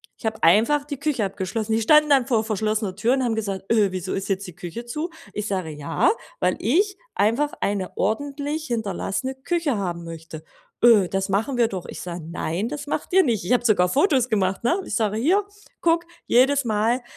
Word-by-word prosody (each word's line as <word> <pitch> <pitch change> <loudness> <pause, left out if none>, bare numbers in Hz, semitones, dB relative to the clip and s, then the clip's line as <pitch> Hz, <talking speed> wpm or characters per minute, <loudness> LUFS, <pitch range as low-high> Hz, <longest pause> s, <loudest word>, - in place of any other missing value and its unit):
Ich - - -5
habe 220 0 -3
einfach 230 - +4
die 285 -2 -6
Küche 280 -7 0
abgeschlossen. 205 +3 -3
Die 225 - +2
standen 300 +6 +5
dann 270 -4 +4
vor 230 -5 +2
verschlossener 215 -2 -1
Türen 235 +6 +1
und 260 - 0
haben 225 -2 0
gesagt: 200 -3 -3
„Öh, 210 -4 +3
wieso 185 0 -4
ist 195 +1 -3
jetzt 195 0 -1
die 180 - -10
Küche 180 +8 -7
zu?“ 305 +8 -4 0.2
Ich 210 0 -3
sage: 185 -5 -2
„Ja, 155 - +1 0.3
weil - - +2
ich 390 - +1 0.2
einfach 235 +9 +2
eine 200 -2 -2
ordentlich 285 +7 -2
hinterlassene 230 +3 -2
Küche 310 0 -1
haben 175 -3 -3
möchte.“ 165 -1 -9 0.4
„Öh, 215 -6 +6
das 195 0 -1
machen 220 +7 0
wir 235 -1 +4
doch.“ 190 -5 -6
Ich - - -7
sage: 175 -2 -6
„Nein, 175 +5 -2
das 295 0 -6
macht 300 - -3
ihr 380 0 +6
nicht.“ 230 -8 0
Ich 175 - -3
habe 245 -1 +2
sogar 185 -6 +4
Fotos 265 - +2
gemacht, 195 -3 0
ne? 340 +11 +2
Ich - - -3
sage: 215 -2 0
„Hier, 350 - +3 0.4
guck, 335 0 +2 0.2
jedes 270 +3 +4
Mal 225 +2 +1
220 Hz, 205 wpm, -23 LUFS, 195-275 Hz, 0.4 s, Öh